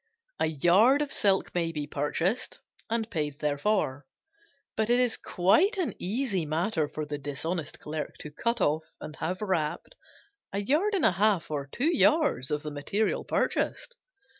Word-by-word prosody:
A - - +2
yard 190 - +4
of 285 - -4
silk 195 -2 +2
may 170 -2 0
be 150 -2 -4
purchased 160 - -1 0.3
and 225 -1 -1
paid 150 -5 -2
therefor, 145 -2 0 0.7
but 220 0 0
it 240 +1 +4
is 250 -2 +2
quite 310 - +2
an 365 -5 -1
easy 205 -1 -1
matter 160 +1 0
for 155 +1 -5
the 145 0 -5
dishonest 150 +3 -4
clerk 150 0 -5
to 150 - -8
cut 235 +9 -1
off 155 +2 +2 0.2
and 150 - -8
have 185 +5 -3
wrapped 170 - -2 0.6
a 200 - -2
yard 310 - +1
and 370 - +2
a - - +6
half 190 -3 +1
or 140 -2 -3
two 315 +7 +1
yards 300 - +3
of 150 0 -1
the 150 - -5
material 195 +9 -1
purchased. 485 - -1
175 Hz, 165 wpm, -28 LUFS, 150-230 Hz, 0.7 s, a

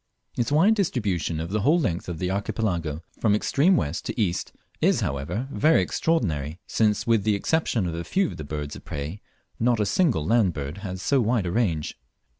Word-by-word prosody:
Its 120 +3 -1
wide 170 +9 +5
distribution 105 - -1
over 85 +4 -5
the 110 - +2
whole 155 - +4
length 90 - -2
of 85 - -4
the 90 +2 -2
Archipelago; 90 -6 -2 0.2
from 105 -2 +3
extreme 160 - +3
west 75 - -2
to - - -5
east, 90 -5 0 0.3
is - - +3
however 70 - -2
very 155 +3 +4
extraordinary, 85 - -1
since, 105 -1 +1
with 115 -4 +3
the 105 0 +2
exception 120 - 0
of 85 - -2
a 85 +1 -4
few 190 - +1
of - - -5
the 75 - -6
birds 75 0 -5
of - - -11
prey, 75 +8 -5 0.4
not 120 0 +2
a 105 - +2
single 115 - +2
land 110 -3 +3
bird 75 +5 -5
has 95 -2 -6
so 140 -2 +3
wide 115 -3 +1
a 85 - -1
range. 90 -8 -1
100 Hz, 200 wpm, -25 LUFS, 85-120 Hz, 0.4 s, wide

